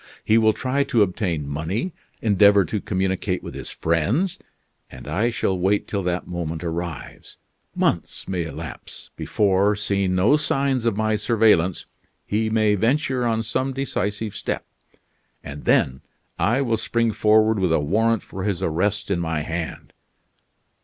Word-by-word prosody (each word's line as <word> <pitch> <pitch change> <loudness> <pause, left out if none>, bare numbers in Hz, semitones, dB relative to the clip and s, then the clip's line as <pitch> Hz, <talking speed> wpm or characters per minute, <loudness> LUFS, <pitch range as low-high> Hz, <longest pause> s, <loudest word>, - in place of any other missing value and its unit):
He 110 +1 +4
will 110 -1 +5
try 130 +4 0
to 120 -6 +3
obtain 90 -6 -2
money, 85 - -3 0.3
endeavor 100 -2 +5
to 100 +5 -3
communicate 95 -1 -1
with - - -7
his - - -7
friends, 100 - 0 0.5
and - - -11
I 115 +4 +1
shall 100 -4 0
wait 95 +3 +1
till 100 - -2
that 90 -1 -2
moment 85 -2 -4
arrives. 85 -1 -6 0.4
Months - - -1
may 90 -3 -2
elapse, 80 -3 -9
before, 100 0 +2
seeing 100 -2 0
no 105 +11 +4
signs 135 -4 0
of 115 -3 +1
my 110 0 +1
surveillance, 105 -7 +2 0.4
he 110 +1 0
may 110 -1 +3
venture 125 +3 +1
on 115 -1 0
some 130 +4 -1
decisive 105 -5 -3
step; - - -3 0.8
and 75 0 -8
then 65 0 +2 0.4
I 120 +6 +2
will 115 -3 0
spring 115 +1 0
forward 110 0 +3
with 90 -3 +1
a 80 - +3
warrant 110 +9 +1
for 95 - -8
his 100 -4 -1
arrest 100 +5 0
in 90 - +1
my 80 -2 -1
hand." 80 +1 -5
100 Hz, 150 wpm, -23 LUFS, 90-115 Hz, 0.8 s, will